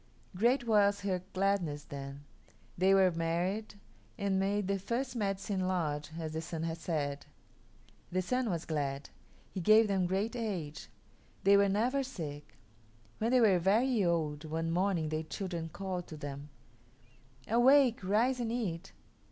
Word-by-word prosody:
Great 240 +6 +2
was 205 -3 +3
her 190 -3 -1
gladness 185 -7 0
then. 140 -2 -8 0.5
They 190 +2 +4
were 190 -1 +5
married 175 +6 -2 0.4
and 200 -3 0
made 200 0 0
the 200 0 0
first 240 +6 -3
Medicine 195 -3 -1
Lodge, 155 -5 -1
as 160 -1 -4
the 160 - -2
Sun 165 0 -5
had 165 0 -3
said. 145 -4 -3 0.8
The 185 +1 0
Sun 250 +4 0
was 170 -4 -2
glad. 140 -3 -3 0.4
He - - -4
gave 215 +5 +6
them 190 -3 +1
great 200 +6 -1
age. 180 - -4 0.5
They 200 +1 +6
were 200 0 +5
never 240 +8 +1
sick. 155 - -7 0.6
When 225 - +1
they 255 0 +4
were 195 -5 +5
very 220 +5 +2
old, 160 -4 0
one 165 +1 -2
morning 175 -3 +1
their 155 0 -1
children 170 0 -5
called 185 0 -5
to 155 - -8
them, 145 0 -7 1.0
"Awake, 245 0 +5
rise 230 +7 +2
and 230 -2 -2
eat." 195 -7 -3
190 Hz, 150 wpm, -32 LUFS, 165-215 Hz, 1.0 s, gave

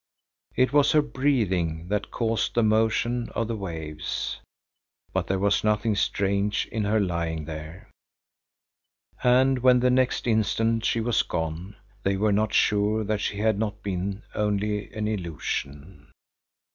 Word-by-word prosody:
It 130 +2 +2
was 145 -1 +4
her 155 - +6
breathing 95 - 0
that 105 0 -1
caused 115 -1 -1
the 120 - +3
motion 110 +2 +1
of 115 - 0
the 115 - -2
waves. 80 -6 -4 0.7
But - - -1
there 95 - 0
was 100 +1 +1
nothing 105 +1 +1
strange 100 +1 0
in 110 -2 -1
her 110 +2 +2
lying 85 -5 -2
there, 80 +6 -8 1.4
and 130 +1 +4
when 125 0 +5
the 125 +1 +3
next 130 0 +1
instant 115 0 +1
she 115 - +1
was 120 +1 +2
gone, 80 +5 -4 0.3
they 100 0 0
were 105 +1 +2
not 105 +1 +1
sure 105 +1 +2
that 105 0 -1
she 100 - -2
had 110 -1 +1
not 110 0 -3
been 100 +1 -3
only 105 0 -1
an 110 -1 -3
illusion. 75 -5 -5
105 Hz, 145 wpm, -26 LUFS, 95-115 Hz, 1.4 s, her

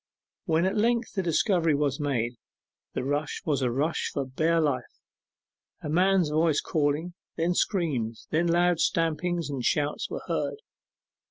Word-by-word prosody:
When 165 +1 +2
at 190 - 0
length 235 +2 +1
the 195 - 0
discovery 170 -2 +2
was 140 -2 0
made, 125 -5 -1 0.6
the - - -2
rush 145 +2 -2
was 145 -4 +1
a 125 - +2
rush 145 +7 -1
for 140 -2 -2
bare 160 +6 +1
life. 140 -6 -1 0.8
A 150 - -4
man's 180 0 +3
voice 155 -1 +3
calling, 155 +3 -1 0.2
then 170 +2 +1
screams, 140 - -1
then 165 +2 +2
loud 175 0 +3
stamping 165 +2 +1
and 135 -4 -4
shouts 145 +3 0
were - - -5
heard. - - -2
160 Hz, 150 wpm, -27 LUFS, 145-175 Hz, 0.8 s, man's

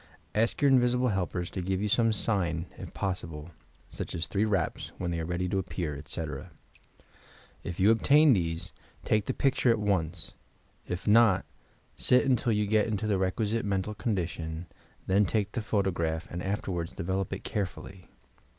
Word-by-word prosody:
Ask 115 +7 +1
your 140 - +6
invisible 125 -1 +4
helpers 90 -3 -2
to 95 - -3
give 95 +1 -1
you 105 - 0
some 115 +2 +3
sign, 90 -6 0
if - - -8
possible, 85 -4 -4 0.4
such - - -5
as 80 - -1
three 100 +2 0
raps 100 -6 -1
when 85 - -2
they 85 - -2
are 80 - -3
ready 90 +1 -1
to 95 - +1
appear, 85 -4 -3
etc. 75 +2 -4 1.1
If 85 - -5
you 100 +4 +6
obtain 145 +6 +6
these, 85 -3 -1 0.3
take 110 -1 +1
the - - 0
picture 135 -2 +2
at 115 - +4
once, 90 -6 -1 0.5
if 90 +1 -4
not, 110 -3 +5 0.5
sit 125 +2 +4
until 125 -2 +2
you 105 -1 +2
get 105 +1 +2
into 110 -1 -2
the 100 -3 +1
requisite 105 +4 0
mental 100 +1 -1
condition, 85 -6 -3 0.4
then 100 +2 +4
take 105 +1 0
the 120 - -2
photograph 90 -7 -1
and 85 - -4
after 95 +1 -2
ward 85 -2 -3
develop 95 +2 -2
it - - -5
carefully. 95 -2 -5
95 Hz, 170 wpm, -29 LUFS, 85-110 Hz, 1.1 s, your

